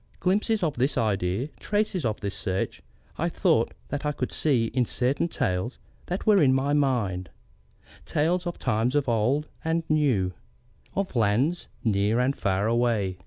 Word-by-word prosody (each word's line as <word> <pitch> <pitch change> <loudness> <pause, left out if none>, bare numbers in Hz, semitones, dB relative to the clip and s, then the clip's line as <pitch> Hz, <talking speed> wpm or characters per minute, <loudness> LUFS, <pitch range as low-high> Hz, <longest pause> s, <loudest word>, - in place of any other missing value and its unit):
Glimpses 205 +2 +1
of 155 -6 0
this 130 +4 +1
idea, 105 +2 0
traces 205 - 0
of 110 -2 -1
this 100 -1 -3
search, 95 -1 -3 0.4
I - - +1
thought - - +1
that 145 +1 -3
I 150 - +1
could 130 -3 -3
see 130 -7 +2
in 125 - +3
certain 130 +7 0
tales 95 - -2 0.3
that 180 +2 -3
were 205 -4 +5
in 130 -3 +5
my 140 +2 +1
mind, 115 - 0 0.8
tales 170 +4 +1
of 175 - -4
times 120 +2 0
old 135 +2 +1 0.2
and 165 +1 0
new, 130 -12 +2 0.6
of 195 -6 -2
lands 120 +10 +1 0.2
near 105 +1 +2
and 130 +3 +2
far 95 0 0
away. 110 -5 +1
130 Hz, 155 wpm, -26 LUFS, 105-155 Hz, 0.8 s, were